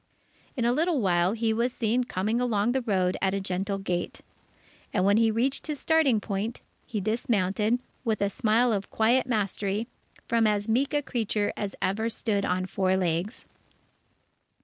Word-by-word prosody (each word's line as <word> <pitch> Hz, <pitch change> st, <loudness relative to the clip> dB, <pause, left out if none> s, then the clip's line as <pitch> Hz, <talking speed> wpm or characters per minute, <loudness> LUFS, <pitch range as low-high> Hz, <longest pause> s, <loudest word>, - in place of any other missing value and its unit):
In 240 Hz, -, 0 dB
a 240 Hz, -, +3 dB
little 325 Hz, +2 st, +1 dB
while, 180 Hz, -2 st, +2 dB
he 225 Hz, -1 st, 0 dB
was 235 Hz, +3 st, 0 dB
seen 240 Hz, +1 st, 0 dB
coming 220 Hz, +3 st, -1 dB
along 230 Hz, -2 st, +1 dB
the 265 Hz, +1 st, 0 dB
road 185 Hz, -6 st, 0 dB
at 195 Hz, 0 st, +1 dB
a -, -, 0 dB
gentle 195 Hz, +1 st, -2 dB
gait. 180 Hz, -3 st, -3 dB, 0.7 s
And 185 Hz, -2 st, +1 dB
when 200 Hz, +1 st, +4 dB
he 225 Hz, 0 st, +4 dB
reached 250 Hz, +8 st, 0 dB
his 300 Hz, -2 st, -3 dB
starting 315 Hz, -8 st, +3 dB
point, 210 Hz, +3 st, -3 dB, 0.3 s
he 215 Hz, -, -3 dB
dismounted, 215 Hz, 0 st, 0 dB, 0.3 s
with 220 Hz, -4 st, 0 dB
a 200 Hz, 0 st, 0 dB
smile 230 Hz, +4 st, +2 dB
of 200 Hz, -1 st, -3 dB
quiet 240 Hz, +4 st, +2 dB
mastery, 205 Hz, -1 st, -1 dB, 0.4 s
from 230 Hz, -1 st, +3 dB
as 205 Hz, 0 st, 0 dB
meek 265 Hz, +6 st, +1 dB
a 290 Hz, -, +1 dB
creature 220 Hz, -5 st, -1 dB
as 200 Hz, -2 st, -4 dB
ever 220 Hz, +4 st, 0 dB
stood 215 Hz, -3 st, -1 dB
on 185 Hz, +1 st, 0 dB
four 190 Hz, 0 st, +1 dB
legs. 180 Hz, +5 st, -2 dB
215 Hz, 170 wpm, -27 LUFS, 195-235 Hz, 0.7 s, when